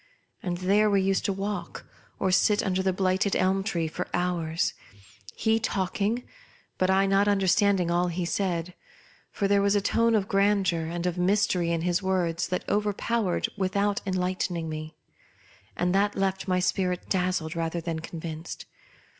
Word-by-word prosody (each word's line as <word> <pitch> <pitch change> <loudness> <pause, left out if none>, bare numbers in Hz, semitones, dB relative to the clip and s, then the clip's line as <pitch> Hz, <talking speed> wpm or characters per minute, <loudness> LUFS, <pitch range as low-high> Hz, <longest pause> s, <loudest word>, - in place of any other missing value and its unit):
And 175 -2 -2
there 200 +4 +3
we 200 -1 +3
used 195 0 +1
to - - +1
walk 195 -2 -4 0.3
or 190 - 0
sit 205 +3 +3
under 190 -1 0
the 190 0 +1
blighted 190 +1 +1
elm 190 +1 +2
tree 170 -6 -1
for 155 - -4
hours; 170 -2 0 0.6
he 220 0 +2
talking, 205 +3 -1 0.6
but 185 - +2
I 190 +1 +4
not 195 +1 +3
under 200 -2 +2
standing 190 -1 +3
all 175 +1 +2
he 175 0 -2
said: 175 -1 -1 0.6
for 200 - -1
there 200 0 +3
was 200 +1 +2
a - - +4
tone 230 +3 +2
of 200 -3 +1
grandeur 195 -5 +2
and 170 +1 -4
of 180 0 -1
mystery 185 -2 +2
in 165 -1 0
his 175 +2 0
words 180 -3 0
that 180 0 -3
overpowered 210 -1 0
without 200 +1 0
enlightening 180 -2 -1
me, 155 0 -6 0.8
and 180 0 +1
that 205 +1 +2
left 195 0 -1
my 185 -1 +2
spirit 180 0 -1
dazzled 180 -3 -1
rather 165 0 -2
than 165 -1 -3
con 165 +1 -7
^ - - -19
vinced. 160 0 -6
185 Hz, 170 wpm, -27 LUFS, 175-200 Hz, 0.8 s, I